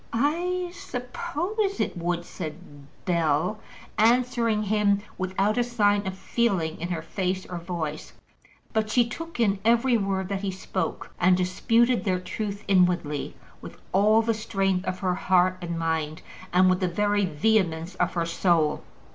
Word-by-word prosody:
"I 350 +8 0
suppose 355 - -3
it - - -1
would," 175 0 -2
said 145 -5 -9 0.2
Bell, 170 +3 +1 0.4
answering 230 -1 +3
him 205 -1 +2
without 195 +4 0
a - - +4
sign 205 -4 +1
of 190 0 -4
feeling 190 -9 0
in 170 - -2
her 170 -3 -3
face 185 +1 -2
or 175 -1 -6
voice. 165 -3 -5 0.6
But 220 -1 0
she 235 +1 +3
took 330 +3 -7
in 200 -4 +2
every 235 +2 +3
word 195 -2 -1
that 195 -1 -2
he 200 - -2
spoke, 190 0 -4
and 180 +1 +4
disputed 230 +7 +2
their 185 -3 0
truth 205 +2 -5
inwardly 180 -6 +1 0.3
with - - -10
all 215 +4 +4
the 230 0 +1
strength 195 -4 -1
of 185 - -1
her 185 -2 +1
heart 185 0 +2
and 170 -1 -4
mind, 160 -1 -2 0.3
and 185 +1 +5
with 185 0 +3
the 185 - +1
very 205 +3 +1
vehemence 170 0 +1
of - - 0
her 170 -1 +1
soul. 165 -2 +1
195 Hz, 155 wpm, -26 LUFS, 175-225 Hz, 0.6 s, and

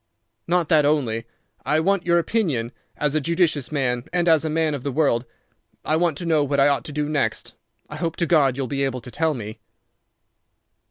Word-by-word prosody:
"Not 175 -1 +1
that 155 -2 +5
only. 125 -7 0 0.4
I 155 - +1
want 195 +2 0
your 170 0 +4
opinion 160 - 0 0.3
as 150 -1 0
a 155 - +1
judicious 165 -4 0
man—as 150 +5 +1
a 160 - -1
man 160 0 0
of 140 - -4
the 140 - -2
world. 130 -4 +1 0.6
I 155 - +1
want 165 -3 +1
to 175 - -5
know 160 -3 +2
what 140 0 0
I 140 +1 +5
ought 135 -4 0
to - - -6
do 150 0 -2
next. 145 -7 -2 0.3
I 150 - -8
hope 165 0 -2
to 170 - 0
God 140 -7 +3
you'll 135 - -1
be 140 +2 -2
able 130 -2 -2
to 125 - -11
tell 160 +1 0
me." 110 -2 -7
150 Hz, 200 wpm, -23 LUFS, 135-165 Hz, 0.6 s, that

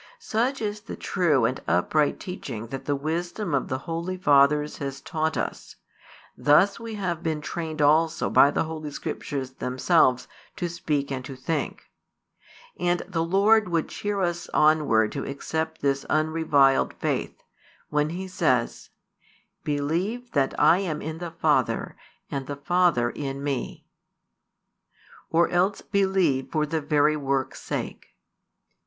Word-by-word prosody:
Such 260 - -1
is 210 0 -3
the 225 - -7
true 155 - +1
and 130 +3 -1
upright 140 - +2
teaching 125 - -6
that 135 +1 -6
the 145 - 0
wisdom 170 +5 -3
of 135 - +1
the 130 - -2
holy 170 +6 -4
fathers 150 -2 +3
has 135 -1 -5
taught 160 +2 -2
us: - - -4 0.6
thus 175 +9 +4
we 230 -1 -6
have 180 -5 -2
been 160 -2 -1
trained 155 -1 -3
also 160 +3 +3
by 140 - +6
the - - 0
Holy 155 -1 -5
Scriptures 135 -2 -5
themselves 130 0 +2 0.3
to 175 - -3
speak 150 -4 -2
and 130 -1 -3
to 135 - -7
think. 150 +5 -3 1.0
And 175 0 +1
the 165 -4 -1
Lord 200 +4 +4
would 165 -2 0
cheer 205 -1 -3
us 175 -1 -2
onward 150 -8 +4
to 140 - -4
accept 160 +3 -4
this 140 -1 +1
unreviled 155 -3 +3
faith, - - -2 0.5
when 150 0 +1
he 185 +3 -5
says: 130 -10 0 0.7
Believe 175 +12 -2
that 135 -2 0
I 165 +4 +6
am 165 -6 -3
in 160 +1 -5
the 175 -1 -5
Father, 165 +1 0 0.4
and 135 -2 -3
the 145 - -4
Father 145 -5 +2
in 140 -1 -5
Me. 140 -3 -3 1.4
Or 170 +1 +3
else 185 +3 +1
believe 190 -9 +1
for 155 -1 +1
the 160 +1 -2
very 150 +1 +3
works' 135 -2 -2
sake. - - -5
155 Hz, 140 wpm, -25 LUFS, 140-175 Hz, 1.4 s, by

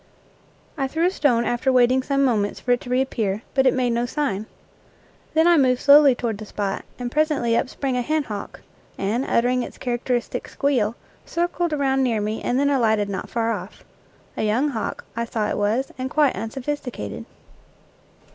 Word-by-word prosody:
I 270 - +1
threw 320 +5 0
a 365 - +3
stone 245 -9 +2
after 240 +2 +1
waiting 255 +1 +4
some 275 +1 +1
moments 210 -5 0
for 250 - -2
it 245 - +2
to 245 - -9
reappear, 235 -5 0
but 265 -1 +3
it - - +4
made 250 -2 +1
no 235 +1 0
sign. 230 -8 -2 0.9
Then 320 +1 +5
I 345 -1 +6
moved 255 -3 +3
slowly 285 -2 +7
toward 225 -4 -3
the 215 - -7
spot, 200 -2 -3
and 245 -1 -4
presently 300 -6 +1
up 250 - 0
sprang 265 -2 -2
a 250 - +1
hen 310 +4 0
hawk 210 -5 -7 0.4
and, 215 +6 -1
uttering 250 0 +1
its - - -7
characteristic 245 0 -2
squeal, 245 -6 0 0.3
circled 345 0 -1
around 270 -2 +1
near 235 -4 +1
me 210 +1 -2
and 250 - 0
then 285 0 +2
alighted 220 -6 +2
not 195 - -4
far 230 -1 0
off. - - -7 0.5
A - - -3
young 225 +7 +1
hawk, 230 -6 -4
I 230 - -1
saw 225 -2 -2
it - - -2
was, 225 +6 0
and 260 +1 -2
quite 295 -2 +2
unsophisticated. 250 +5 -5
250 Hz, 185 wpm, -23 LUFS, 225-275 Hz, 0.9 s, slowly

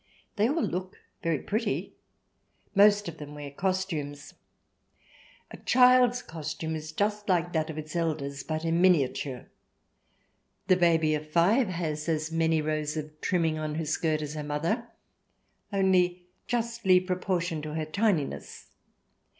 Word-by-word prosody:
They 215 +3 +2
all 315 +3 0
look 185 +1 -3 0.2
very 165 -3 +1
pretty. 215 - -2 0.8
Most 205 0 +5
of 165 -1 -7
them 150 0 -8
wear 145 -1 -7
costumes. 155 -5 -3 1.2
A - - -8
child's 250 -1 +5
costume 160 0 -5
is 155 0 -6
just 205 +4 -1
like 175 -1 +1
that 155 -1 0
of 155 - -6
its 155 +1 -7
elders, 150 -4 -2
but 155 +1 -3
in 165 +1 +1
miniature. 140 -7 +2 1.2
The 185 - +5
baby 165 -3 +3
of 155 0 -3
five 195 +10 +3
has 165 -3 -3
as 155 0 -1
many 160 -1 +2
rows 155 0 -2
of 155 0 -7
trimming 165 -3 +1
on 155 -1 -3
her 160 0 -2
skirt 155 0 0
as 150 0 -5
her 150 -1 -4
mother, 165 +11 -1 0.8
only 185 -2 +2 0.2
justly 230 -6 +2
proportioned 180 -3 -2
to 155 0 -5
her 160 -1 -1
tininess. 185 -3 -1
165 Hz, 140 wpm, -28 LUFS, 155-190 Hz, 1.2 s, Most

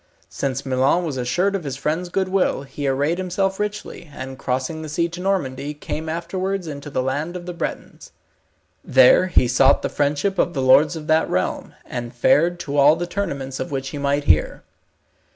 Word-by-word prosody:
Since 135 0 -3
Milon 135 +6 +2
was 150 -5 -3
assured 175 +11 0
of 190 - -3
his 135 -3 -4
friend's 160 +6 -2
goodwill, 190 -5 0
he 140 +1 -5
arrayed 145 +6 0
himself 190 +1 -1
richly, 210 -5 -5
and 130 -1 -7
crossing 130 +5 -2
the 155 - -7
sea 170 +3 0
to 175 +1 -7
Normandy, 150 -7 -2
came 155 +2 -5
afterwards 185 +3 -3
into 145 -2 -7
the 130 -2 -1
land 145 +7 -2
of 175 -1 -6
the 180 - -5
Bretons. 170 - -6 0.7
There 130 +8 +6
he 150 -8 +3
sought 130 +3 +4
the - - -1
friendship 150 +7 0
of 175 - +1
the 135 - 0
lords 145 +5 +5
of 155 -2 -7
that 155 +1 +2
realm, 90 0 -2
and 120 -1 -6
fared 165 +8 +3
to 145 -2 -4
all 145 +2 +6
the 175 +1 -3
tournaments 140 -9 -4
of 175 - -3
which 135 -2 -3
he 145 - -6
might 140 +1 0
hear. 80 - +2
150 Hz, 190 wpm, -22 LUFS, 135-175 Hz, 0.7 s, There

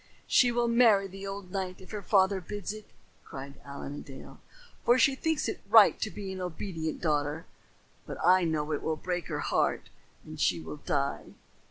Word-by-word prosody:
"She 245 -2 +4
will 240 0 +1
marry 230 -4 +5
the 195 +1 -8
old 195 -2 -7
knight 185 -1 -3
if 185 - -14
her 210 -2 -4
father 190 -1 +3
bids 205 +3 -5
her," 215 - -7 0.4
cried 140 0 -9
Allen 140 0 -7
a 145 - -6
Dale, 135 -2 -11 0.4
"for 240 - +5
she 275 +1 +4
thinks 320 +3 -1
it - - -4
right - - +7
to - - -1
be 195 -2 -6
an 185 - -6
obedient 165 -2 -4
daughter; 150 -1 -1 0.6
but - - -6
I 185 +1 +6
know 155 -2 -1
it 150 - -1
will 160 - -1
break 175 +2 -3
her - - -3
heart - - 0 0.4
and - - -9
she 85 - +2
will 80 -1 -7
die." - - -2
185 Hz, 190 wpm, -29 LUFS, 155-205 Hz, 0.6 s, right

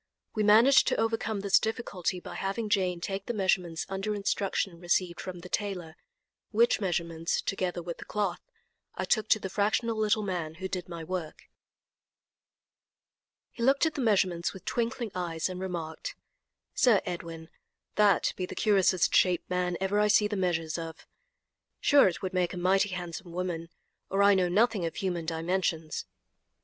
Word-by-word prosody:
We 215 - -1
managed 220 +6 +6
to - - +2
overcome 225 -2 -1
this 200 -1 +4
difficulty 210 -6 -2
by - - -9
having 205 +3 -3
Jane 185 -5 +1
take 195 +2 -4
the 240 - -2
measurements 180 -4 0
under 195 +2 -2
instructions 195 -3 -1
received 175 0 0
from 180 -2 -7
the 180 - -9
tailor, 180 -5 -3 0.5
which 230 0 +3
measurements, 170 -3 -1
together 180 -3 -2
with 170 0 -6
the - - -8
cloth, 200 -4 -2 0.5
I - - -2
took 215 -2 +1
to 215 - +5
the 195 - -4
fractional 215 +4 0
little 215 0 +1
man 170 -5 -3
who 190 +2 -4
did 180 -2 -5
my 170 -1 -6
work. 170 -2 -5 2.1
He 235 - -10
looked 270 +6 +4
at 320 - 0
the 280 - -3
measurements 185 -7 +1
with 190 - -12
twinkling 235 -1 -2
eyes, 170 -3 -2
and 185 -1 -6
remarked: 170 -4 -5 0.6
"Sir 230 -6 +4
Edwin, 165 -3 -6 0.4
that 210 -1 +3
be 185 - -3
the - - -8
curiousest 190 -4 +3
shaped 180 -2 +3
man 180 -1 0
ever 195 +2 +1
I 210 - +4
see 210 0 +4
the 210 - -3
measures 170 -4 -1
of. 165 -1 -8 0.7
Sure 285 -5 +6
it 180 - -3
would 185 - -3
make 180 -1 0
a - - -6
mighty 190 +3 +2
handsome 175 -1 -6
woman, 170 -2 -3 0.4
or 195 +1 +2
I 200 0 +7
know 185 -2 +2
nothing 215 +1 +2
of 165 - -3
human 175 -4 -2
dimensions." 165 -1 -1
185 Hz, 165 wpm, -29 LUFS, 175-210 Hz, 2.1 s, I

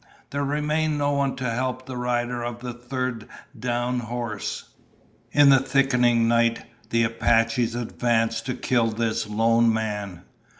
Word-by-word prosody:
There 140 0 -1
remained 150 +2 0
no 145 0 +1
one 140 -1 0
to 130 - -3
help 130 +2 -2
the 130 - -7
rider 120 0 -1
of 120 -1 -4
the 125 -1 -5
third 125 -1 -4 0.3
downed 125 0 -1
horse. 115 -3 -4 0.7
In 145 -1 +6
the 135 -1 +7
thickening 125 -3 +2
night, 115 0 +2 0.2
the 115 0 +2
Apaches 115 +1 +1
advanced 115 -1 0
to 125 - -2
kill 125 -2 +1
this 110 -1 -1
lone 115 +2 +3
man. 105 -5 -3
120 Hz, 140 wpm, -24 LUFS, 115-130 Hz, 0.7 s, the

